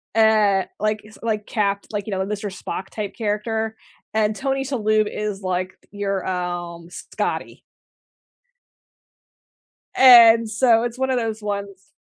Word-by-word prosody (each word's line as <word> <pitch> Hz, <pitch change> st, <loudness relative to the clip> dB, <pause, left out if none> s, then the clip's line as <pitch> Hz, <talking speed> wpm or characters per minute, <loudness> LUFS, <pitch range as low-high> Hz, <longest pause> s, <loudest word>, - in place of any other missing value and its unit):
uh, 215 Hz, -3 st, +4 dB, 0.2 s
like, 215 Hz, 0 st, -1 dB
s 215 Hz, -, -16 dB
like, 215 Hz, -2 st, -2 dB
capt 200 Hz, -2 st, -1 dB
like, 205 Hz, 0 st, -3 dB
you -, -, -4 dB
know, 190 Hz, 0 st, -1 dB
the 210 Hz, -, -3 dB
Mr. 205 Hz, 0 st, -4 dB
Spock 190 Hz, -, -6 dB
type 205 Hz, -2 st, -6 dB
character, 220 Hz, +1 st, -2 dB, 0.4 s
and 215 Hz, -1 st, +1 dB
Tony 270 Hz, +1 st, -1 dB
Shalhoub 215 Hz, -5 st, +1 dB
is, 210 Hz, -2 st, -4 dB
like, 185 Hz, 0 st, -2 dB, 0.2 s
your, 200 Hz, -2 st, -3 dB
um, 175 Hz, -2 st, -4 dB
Scotty. -, -, -5 dB, 2.3 s
And 230 Hz, -3 st, +8 dB
so, 230 Hz, 0 st, +3 dB
it's 240 Hz, +1 st, -4 dB
1 265 Hz, 0 st, 0 dB
of 255 Hz, -, +1 dB
those 220 Hz, -2 st, -3 dB
ones 200 Hz, -2 st, -6 dB
210 Hz, 140 wpm, -22 LUFS, 200-225 Hz, 2.3 s, And